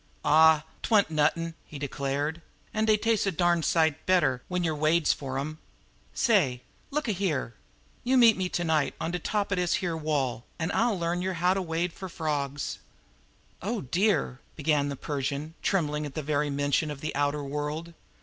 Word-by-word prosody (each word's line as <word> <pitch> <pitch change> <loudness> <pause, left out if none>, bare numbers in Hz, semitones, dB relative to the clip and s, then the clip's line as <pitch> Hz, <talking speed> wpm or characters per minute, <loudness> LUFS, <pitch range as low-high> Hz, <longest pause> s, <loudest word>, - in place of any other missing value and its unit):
"Aw, 155 +1 +6 0.2
't - - -3
wan't 205 -7 +4
nuttin'," 160 +2 +1
he 150 - -10
declared, 140 +3 -2 0.3
"an' 215 0 +1
dey 215 -1 +4
tastes 220 -1 +1
a - - +2
darn 175 0 +2
sight 160 -1 +2
better 145 -9 +3
when 180 -1 -1
yer 160 -2 +1
wades 155 +1 +3
fer 135 -2 -5
'em. 155 +3 -4 0.6
Say! 145 - +2 0.3
Look 300 -1 -2
a - - +2
here! 175 - -1 0.5
You 260 +2 +3
meet 230 -3 +7
me 185 -1 -2
to 175 - -1
night 160 -3 +1
on 165 - -2
de 180 - -2
top 205 +3 -1
er 200 - +1
dis 180 -1 +1
here 175 -3 -1
wall, 140 -7 -1
an' 160 - -2
I'll 230 -3 +2
learn 170 +1 -1
yer 190 +1 -1
how 180 +2 +2
to 195 - -1
wade 170 0 -2
fer 190 - -7
frawgs." 145 -4 -3 0.8
"Oh, 215 +4 -2
dear!" 165 - +1 0.2
began 145 -2 +1
the 140 - -3
Persian, 140 +2 -3
trembling 150 -5 0
at 135 - -11
the 155 - -3
very 145 0 0
mention 145 +2 0
of 145 -2 -6
the 155 - -3
outer 145 +1 0
world. 150 +4 -4
160 Hz, 190 wpm, -28 LUFS, 145-180 Hz, 0.8 s, meet